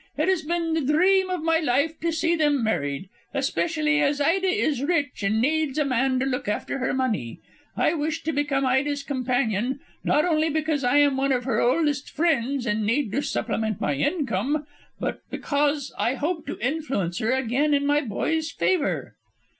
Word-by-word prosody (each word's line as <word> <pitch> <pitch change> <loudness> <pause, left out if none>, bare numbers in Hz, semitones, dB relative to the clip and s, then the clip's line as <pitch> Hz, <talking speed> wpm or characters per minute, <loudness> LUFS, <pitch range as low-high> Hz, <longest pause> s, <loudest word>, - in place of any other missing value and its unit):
It - - +1
has 375 -3 +2
been 335 +1 -1
the 320 - +1
dream 370 +7 +3
of 365 -3 -2
my 325 0 +3
life 295 +2 0
to 335 +1 0
see 330 +1 +1
them 295 -5 +2
married, 145 -6 -1 0.3
especially 310 -2 +1
as 285 0 +1
Ida 350 +7 +2
is 310 -7 +1
rich 290 -4 0
and 215 +2 +1
needs 305 +2 +1
a 300 - +2
man 260 0 +1
to 265 - 0
look 260 -2 -2
after 210 +5 -2
her 260 - 0
money. 225 - -2 0.4
I - - +2
wish 315 0 -2
to 320 - -1
become 275 -1 0
Ida's 280 +2 +1
companion, 250 -2 -1 0.2
not 300 - +2
only 320 -2 +2
because 310 -2 -1
I 245 +3 +3
am 285 -2 +4
one 275 +1 +1
of 250 -2 +1
her 230 -3 0
oldest 290 +2 +1
friends 280 -5 0
and 215 -1 0
need 230 +2 0
to 280 - 0
supplement 220 -6 -2
my 145 - 0
income, 275 - -1 0.3
but - - -3
because 285 -1 -1
I 245 - +1
hope 320 +3 -3
to - - -4
influence 250 - -2
her 225 +4 +1
again 265 +4 +1
in 285 0 0
my 290 +1 +3
boy's 315 +6 -1
favour." 325 -2 0
285 Hz, 185 wpm, -25 LUFS, 250-315 Hz, 0.4 s, am